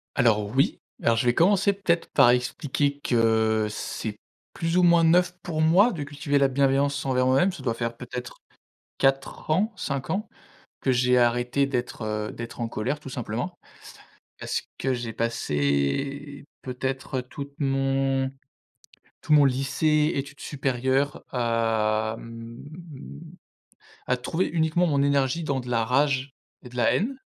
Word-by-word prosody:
Alors 110 Hz, -5 st, +3 dB
oui. 135 Hz, +5 st, +1 dB, 0.2 s
Alors 115 Hz, -1 st, +3 dB
je 115 Hz, -, 0 dB
vais 120 Hz, -, +4 dB
commencer 195 Hz, +5 st, +4 dB
peut-être 180 Hz, -4 st, 0 dB
par 120 Hz, -, +6 dB
expliquer 140 Hz, +3 st, 0 dB
que 110 Hz, -3 st, +2 dB
c'est 105 Hz, 0 st, -5 dB, 0.4 s
plus 165 Hz, +1 st, -1 dB
ou 180 Hz, -, +5 dB
moins 170 Hz, -1 st, +5 dB
neuf 175 Hz, +2 st, +4 dB
pour 160 Hz, -4 st, -3 dB
moi 180 Hz, +9 st, +5 dB
de 160 Hz, -6 st, -5 dB
cultiver 145 Hz, 0 st, -1 dB
la 140 Hz, -1 st, +4 dB
bienveillance 140 Hz, +1 st, +1 dB
envers 130 Hz, -1 st, +2 dB
moi-même. 135 Hz, +9 st, +3 dB
Ça 140 Hz, -, -9 dB
doit 115 Hz, -3 st, 0 dB
faire 115 Hz, 0 st, -3 dB
peut-être 125 Hz, 0 st, -7 dB, 0.6 s
4 135 Hz, +2 st, 0 dB
ans, 200 Hz, +8 st, +2 dB
5 140 Hz, -7 st, -4 dB
ans 215 Hz, +2 st, -2 dB, 0.5 s
que 135 Hz, -, +2 dB
j'ai 125 Hz, 0 st, +3 dB
arrêté 120 Hz, +3 st, +2 dB
d'être, 125 Hz, -3 st, -3 dB
heu, 105 Hz, 0 st, -3 dB
d'être 115 Hz, +1 st, -8 dB
en 115 Hz, -, -1 dB
colère 125 Hz, +6 st, -3 dB
tout 140 Hz, -, -9 dB
simplement. 125 Hz, +8 st, -4 dB, 0.8 s
Parce -, -, -2 dB, 0.2 s
que 135 Hz, -, 0 dB
j'ai 120 Hz, -2 st, -4 dB
passé, 115 Hz, -, -1 dB, 0.2 s
peut-être, 130 Hz, +1 st, -3 dB
heu, -, -, -2 dB
toute 140 Hz, +2 st, -8 dB
mon 135 Hz, -1 st, +1 dB, 0.9 s
tout 150 Hz, -, +1 dB
mon 145 Hz, -1 st, +7 dB
lycée, 150 Hz, +4 st, +2 dB
études 140 Hz, +1 st, -5 dB
supérieures 135 Hz, 0 st, -1 dB
à, 110 Hz, -2 st, 0 dB
mmh, 115 Hz, 0 st, -10 dB, 1.5 s
à 125 Hz, -, +2 dB
trouver 160 Hz, +8 st, -1 dB
uniquement 160 Hz, +1 st, +1 dB
mon 140 Hz, -3 st, +2 dB
énergie 140 Hz, +3 st, +1 dB
dans 135 Hz, -3 st, -1 dB
de 125 Hz, -, -9 dB
la 115 Hz, -2 st, +1 dB
rage 135 Hz, +1 st, +1 dB, 0.3 s
et -, -, -9 dB
de 125 Hz, -, -14 dB
la 120 Hz, -, +3 dB
haine. 250 Hz, +7 st, -1 dB
135 Hz, 150 wpm, -25 LUFS, 120-145 Hz, 1.5 s, mon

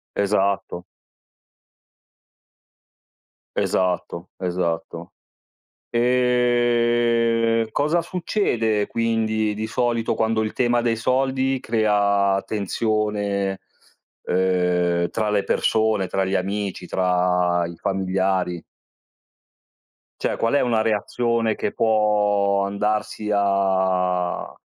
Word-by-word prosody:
Esatto. 100 Hz, -3 st, 0 dB, 2.7 s
Esatto, 90 Hz, -1 st, -1 dB
esatto. 90 Hz, -2 st, -3 dB, 0.8 s
Ehm, 120 Hz, -2 st, +2 dB
cosa 155 Hz, +4 st, +1 dB
succede 120 Hz, -, -1 dB
quindi 110 Hz, -2 st, 0 dB
di 110 Hz, +1 st, -4 dB
solito 120 Hz, -1 st, 0 dB
quando 110 Hz, 0 st, +1 dB
il 110 Hz, -, -3 dB
tema 120 Hz, -1 st, +1 dB
dei 115 Hz, -1 st, 0 dB
soldi 130 Hz, +2 st, 0 dB
crea 100 Hz, -3 st, +1 dB
tensione, 105 Hz, -2 st, -1 dB, 0.6 s
ehm, 90 Hz, -1 st, +1 dB
tra 110 Hz, -2 st, -1 dB
le 105 Hz, -1 st, +1 dB
persone, 110 Hz, -3 st, +1 dB
tra 95 Hz, +1 st, -1 dB
gli 95 Hz, +1 st, -1 dB
amici, 100 Hz, -1 st, -3 dB
tra 90 Hz, -1 st, +1 dB
i 85 Hz, 0 st, -10 dB
familiari? 95 Hz, -2 st, -1 dB, 1.6 s
Cioè, -, -, -1 dB
qual 115 Hz, +3 st, 0 dB
è 145 Hz, -, +4 dB
una 120 Hz, -3 st, +1 dB
reazione 115 Hz, +1 st, 0 dB
che -, -, -3 dB
può 105 Hz, -2 st, +2 dB
andarsi 105 Hz, +1 st, -2 dB
a 95 Hz, -3 st, 0 dB
105 Hz, 85 wpm, -22 LUFS, 95-115 Hz, 2.7 s, è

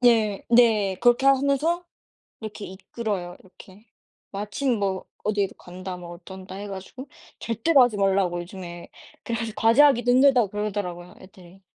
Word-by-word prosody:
네. 225 Hz, -5 st, +3 dB
네. 220 Hz, -5 st, +4 dB
그렇게 240 Hz, +2 st, +3 dB
하면서 280 Hz, +6 st, +2 dB, 0.6 s
이렇게 215 Hz, -1 st, -7 dB
이끌어요, 190 Hz, -1 st, -5 dB
이렇게. 190 Hz, +2 st, -17 dB, 0.5 s
마침 210 Hz, +5 st, -2 dB
뭐 195 Hz, -2 st, -2 dB, 0.2 s
어디로 205 Hz, -2 st, 0 dB
간다 185 Hz, +1 st, -8 dB
뭐 175 Hz, -1 st, -10 dB
어쩐다 185 Hz, +2 st, -11 dB
해 205 Hz, +1 st, -6 dB
가지고 200 Hz, +8 st, -9 dB, 0.3 s
절대로 245 Hz, +6 st, +3 dB
하지 245 Hz, -4 st, +2 dB
말라고 195 Hz, -3 st, +1 dB
요즘에 175 Hz, -1 st, -9 dB, 0.4 s
그래 230 Hz, -1 st, -2 dB
가지고 230 Hz, -2 st, -4 dB
과제하기도 245 Hz, +1 st, +5 dB
힘들다고 255 Hz, -4 st, +5 dB
그러더라고요 195 Hz, -4 st, -4 dB
애들이. 185 Hz, 0 st, -16 dB
205 Hz, 345 characters per minute, -24 LUFS, 190-240 Hz, 0.6 s, 과제하기도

